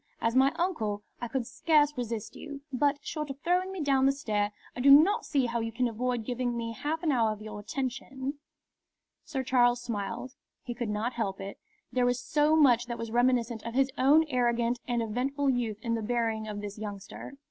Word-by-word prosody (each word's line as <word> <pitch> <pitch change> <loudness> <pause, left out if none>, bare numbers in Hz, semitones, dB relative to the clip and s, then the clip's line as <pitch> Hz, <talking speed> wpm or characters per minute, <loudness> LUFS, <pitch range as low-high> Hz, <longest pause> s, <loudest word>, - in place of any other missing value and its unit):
As 230 +1 0
my 265 +1 +5
uncle, 220 - -1 0.2
I 240 - -2
could 250 +1 -2
scarce 295 +2 +2
resist 230 -4 -4
you. 285 -2 -8
But, 285 +2 +2
short 305 -2 -4
of 275 0 -6
throwing 360 +2 +1
me 380 -3 -5
down 270 -2 +3
the - - +5
stair, 210 -7 -1 0.2
I - - -6
do 270 +3 +5
not 310 +9 +6
see 275 -4 +2
how 235 0 -1
you 225 0 -2
can 245 +2 0
avoid 240 0 -2
giving 245 -1 -2
me 230 0 -3
half 310 +8 -3
an 320 - +2
hour 230 -5 +2
of 215 - -6
your 215 -1 -7
attention." 265 +4 -4 0.9
Sir 285 -4 -3
Charles 245 -1 +3
smiled. 235 +2 -4 0.3
He 245 - -4
could 235 -2 -4
not 215 +4 -1
help 200 -5 -2
it. 195 +1 -7 0.3
There 250 0 +3
was 245 0 +1
so 300 +1 +2
much 245 -6 +5
that 235 -1 -4
was 230 -1 -5
reminiscent 240 -1 +2
of 230 +1 -6
his 270 0 +3
own 295 +5 +5
arrogant 240 -2 +1
and 240 -2 0
eventful 270 +5 0
youth 235 -4 -1
in 230 -2 -1
the 225 - -1
bearing 225 -1 -1
of 205 -1 -5
this 205 0 -7
youngster. 205 +3 -7
245 Hz, 205 wpm, -29 LUFS, 230-275 Hz, 0.9 s, not